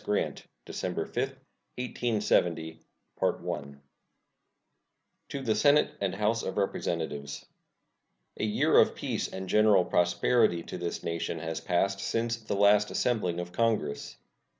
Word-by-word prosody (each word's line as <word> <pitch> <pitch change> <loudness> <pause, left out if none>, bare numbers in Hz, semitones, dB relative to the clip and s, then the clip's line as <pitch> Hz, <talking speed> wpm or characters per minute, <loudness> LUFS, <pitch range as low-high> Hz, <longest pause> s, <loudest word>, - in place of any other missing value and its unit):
Grant 105 - -2 0.2
December - - -3
5, - - -3 0.4
1870 95 -10 0 0.4
To 70 0 -2 1.7
the 115 -4 +2
Senate 145 +7 +4
and 95 -1 -1
House 105 +3 +1
of 95 - -4
Representatives: 80 -7 -2 0.9
A - - -3
year 105 -1 +4
of - - +4
peace - - -2
and 95 0 -6
general 105 -2 +5
prosperity 90 +1 +2
to - - -7
this 85 0 -4
nation 85 0 -2
has 80 0 -4
passed 95 +2 +1
since 115 +2 -1
the 110 -3 -4
last 105 +1 +5
assembling 95 -8 0
of 90 0 -5
Congress. 105 -9 -1
100 Hz, 120 wpm, -29 LUFS, 85-110 Hz, 1.7 s, general